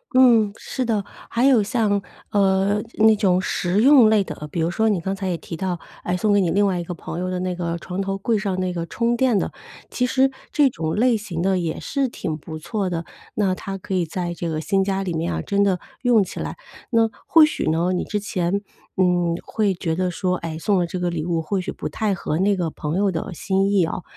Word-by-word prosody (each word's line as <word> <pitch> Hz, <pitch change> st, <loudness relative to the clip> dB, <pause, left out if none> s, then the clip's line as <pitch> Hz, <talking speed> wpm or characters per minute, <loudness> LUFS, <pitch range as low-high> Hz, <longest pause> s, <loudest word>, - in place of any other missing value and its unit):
嗯， 235 Hz, -5 st, +6 dB
是 260 Hz, -, -4 dB
的。 215 Hz, -4 st, 0 dB, 0.2 s
还 235 Hz, +2 st, +1 dB
有 260 Hz, -5 st, +6 dB
像， 205 Hz, -1 st, +1 dB, 0.3 s
呃， 195 Hz, +1 st, +2 dB, 0.2 s
那 220 Hz, 0 st, +6 dB
种 190 Hz, -4 st, +2 dB
实 185 Hz, +1 st, 0 dB
用 265 Hz, -5 st, +7 dB
类 215 Hz, -2 st, +4 dB
的， 150 Hz, -3 st, -7 dB
比 -, -, -3 dB
如 165 Hz, +1 st, +1 dB
说 220 Hz, +5 st, +2 dB
你 200 Hz, -4 st, +1 dB
刚 190 Hz, +3 st, -2 dB
才 195 Hz, -1 st, -3 dB
也 175 Hz, -, -1 dB
提 165 Hz, -, -8 dB
到， 180 Hz, -1 st, -2 dB, 0.2 s
哎， 180 Hz, +1 st, -1 dB
送 210 Hz, +2 st, +2 dB
给 205 Hz, -, +4 dB
你 180 Hz, -, +1 dB
另 200 Hz, +5 st, +3 dB
外 190 Hz, -3 st, 0 dB
一 -, -, -3 dB
个 175 Hz, +1 st, -6 dB
朋 165 Hz, -, -6 dB
友 185 Hz, +1 st, -2 dB
的 185 Hz, 0 st, -2 dB
那 185 Hz, -1 st, -2 dB
个 170 Hz, -1 st, -2 dB
床 180 Hz, +2 st, -4 dB
头 195 Hz, 0 st, -2 dB
柜 225 Hz, +4 st, 0 dB
上 195 Hz, -3 st, -2 dB
那 185 Hz, -1 st, -1 dB
个 170 Hz, -1 st, -4 dB
充 235 Hz, +4 st, 0 dB
电 245 Hz, -3 st, +2 dB
的， -, -, -1 dB, 0.4 s
其 250 Hz, -, 0 dB
实 265 Hz, +1 st, +3 dB, 0.2 s
这 295 Hz, -2 st, +4 dB
种 160 Hz, -6 st, -3 dB
类 240 Hz, +2 st, +3 dB
型 195 Hz, -6 st, -4 dB
的 190 Hz, -1 st, +2 dB
也 165 Hz, -2 st, -2 dB
是 275 Hz, -1 st, -1 dB
挺 165 Hz, -8 st, -4 dB
不 155 Hz, +1 st, -7 dB
错 195 Hz, +4 st, -2 dB
的。 170 Hz, -2 st, -3 dB, 0.3 s
那 200 Hz, -3 st, +2 dB
她 195 Hz, +1 st, -5 dB
可 195 Hz, -, -6 dB
以 185 Hz, -2 st, +2 dB
在 175 Hz, +1 st, -3 dB
这 170 Hz, 0 st, -4 dB
个 155 Hz, -1 st, -2 dB
新 195 Hz, +5 st, +1 dB
家 195 Hz, 0 st, -1 dB
里 180 Hz, -3 st, -3 dB
面 160 Hz, -, -1 dB
啊， 80 Hz, -1 st, -2 dB
真 200 Hz, 0 st, +1 dB
的 190 Hz, -3 st, +2 dB, 0.2 s
用 240 Hz, -4 st, +4 dB
起 -, -, -7 dB
来。 -, -, -4 dB, 0.3 s
那， 230 Hz, -1 st, +3 dB, 0.2 s
或 320 Hz, -2 st, +7 dB
许 305 Hz, -, -1 dB
呢， 170 Hz, +3 st, +1 dB
你 180 Hz, -, 0 dB
之 210 Hz, -, -2 dB
前， 195 Hz, -1 st, -1 dB, 0.4 s
嗯， 175 Hz, -2 st, +2 dB
会 205 Hz, -4 st, 0 dB
觉 165 Hz, -2 st, -2 dB
得 185 Hz, +1 st, 0 dB
说， 180 Hz, +1 st, -1 dB
哎， 165 Hz, -2 st, -5 dB
送 195 Hz, +4 st, +1 dB
了 175 Hz, -, 0 dB
这 180 Hz, +2 st, -4 dB
个 175 Hz, -1 st, 0 dB
礼 165 Hz, -3 st, -3 dB
物 170 Hz, 0 st, 0 dB
或 185 Hz, +4 st, -1 dB
许 -, -, -4 dB
不 -, -, -5 dB
太 210 Hz, -3 st, -1 dB
合 160 Hz, -2 st, -2 dB
那 200 Hz, +2 st, +3 dB
个 175 Hz, -4 st, -2 dB
朋 150 Hz, +1 st, -4 dB
友 200 Hz, 0 st, +2 dB
的 170 Hz, +3 st, -4 dB
心 195 Hz, +3 st, +1 dB
意 195 Hz, -4 st, +4 dB
哦。 170 Hz, +2 st, -4 dB
190 Hz, 265 characters per minute, -22 LUFS, 175-210 Hz, 0.4 s, 用